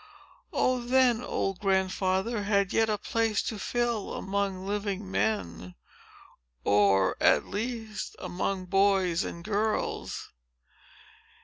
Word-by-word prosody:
Oh, 255 -1 +1
then, 245 -1 +3
old 195 -5 -2
Grandfather 190 +2 0
had 200 -2 +1
yet 225 0 +3
a 210 - +1
place 225 0 0
to 220 - -4
fill 235 -2 -1
among 195 -1 -2
living 200 -1 -3
men,—or 90 - -2 1.5
at - - +4
least 220 -1 -4
among 185 +1 -3
boys 195 -2 +2
and 170 - -6
girls! 215 +2 -2
200 Hz, 100 wpm, -28 LUFS, 190-220 Hz, 1.5 s, at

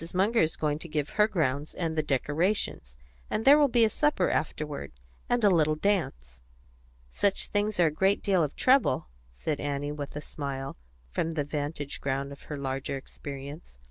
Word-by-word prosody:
Munger 210 +5 +3
is 160 0 +1
going 150 -1 -1
to 170 - -6
give 150 -2 -1
her 210 0 +3
grounds 150 -7 -1
and 165 -2 -2
the 155 - +2
decorations, 150 - -1 0.3
and 220 - -1
there 285 +2 +8
will 290 - +6
be 240 -3 +4
a - - +4
supper 295 -6 +2
afterward, 150 - -3 0.4
and 245 -1 +2
a 205 - +7
little 155 -3 +3
dance." 65 - -1 0.7
"Such 200 -1 0
things 205 -1 0
are 175 - +6
a 155 - +3
great 190 +6 +2
deal 190 -4 +3
of 150 - -3
trouble," 255 - +3 0.2
said 140 - -3
Annie, 145 0 -2
with 145 -1 -6
a - - -2
smile, 140 -3 -5 0.4
from 165 - -1
the 150 -2 0
vantage 145 0 -4
ground 140 0 -2
of 140 - -10
her 150 - -3
larger 135 0 -3
experience. 140 - -9
150 Hz, 180 wpm, -28 LUFS, 140-195 Hz, 0.7 s, there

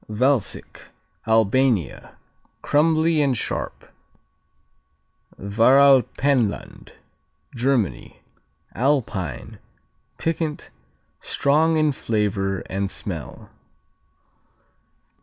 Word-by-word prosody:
Valsic 125 +2 -1 0.4
Albania 110 - +1 0.5
Crumbly 160 +1 +2
and 135 -4 +1
sharp. - - -5 1.5
Varalpenland 130 +2 +2 0.6
Germany 120 - -1 0.5
Alpine. 115 - -2 0.6
Piquant, 160 -2 -3 0.5
strong 160 +3 +1
in 155 -1 +2
flavor 100 -6 -2
and 100 0 -3
smell. 85 -9 -7
125 Hz, 55 wpm, -22 LUFS, 100-145 Hz, 1.5 s, Crumbly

